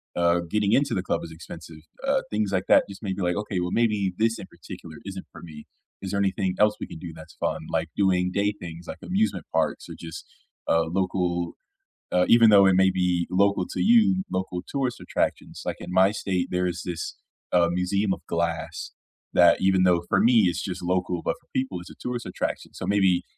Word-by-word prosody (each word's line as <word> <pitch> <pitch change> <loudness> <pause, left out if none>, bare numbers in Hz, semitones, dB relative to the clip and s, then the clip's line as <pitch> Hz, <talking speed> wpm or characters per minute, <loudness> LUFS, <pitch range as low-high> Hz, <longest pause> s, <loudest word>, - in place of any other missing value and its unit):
uh, 85 0 +3
getting 105 +1 +1
into 140 +1 +2
the 95 - -1
club 85 - -1
is 80 - -8
expensive, 80 0 -10 0.3
uh, 275 -1 +2
things 105 -1 -1
like 95 -1 0
that - - +6
just 100 +3 -10
may 95 -2 -2
be, 95 - -5
like, 90 0 +1
okay, 105 -3 -2
well 90 0 -2
maybe 105 -5 +1
this 115 +1 +2
in - - -8
particular 80 -2 -11
isn't 95 -1 -6
for - - -12
me. 75 -3 -11 0.4
Is 95 - -5
there 100 - 0
anything 95 -1 0
else 105 0 +4
we - - -5
can 80 - -9
do 85 -2 -7
that's 80 -1 -13
fun, - - -2
like, - - -1
doing 90 -2 +2
day 100 +2 +1
things 85 0 -9
like - - -7
amusement 205 +4 0
parks - - 0
or - - -7
just 80 -1 -8 0.4
a 80 - +3
local 90 0 -1 0.6
Uh, 90 0 +3
even 115 -2 +7
though 100 -1 +7
it 95 - +4
may 95 0 +5
be 90 -2 +1
local 100 0 +2
to - - -4
you, 210 -4 +4
local 95 -1 -2
tourist 135 -3 -2
attractions, - - -2
like - - -3
in 90 +1 -8
my 95 +2 +5
state, 95 -4 -1
there 90 0 +1
is 90 0 -4
this, 85 -2 -4 0.4
uh, 85 -1 +4
museum 95 +2 +1
of - - -8
Glass 85 0 -2 0.4
that - - +6
even 95 -1 +4
though 85 -2 +3
for - - +2
me 120 -1 +5
it's 90 +1 -1
just 90 -2 -5
local, 90 -1 -1
but - - 0
for - - -35
people 130 -9 -1
it's 85 - -11
a - - -12
tourist 125 -1 -4
attraction. - - -4
So, - - -5
maybe 95 -3 +3
95 Hz, 215 wpm, -25 LUFS, 90-100 Hz, 0.6 s, even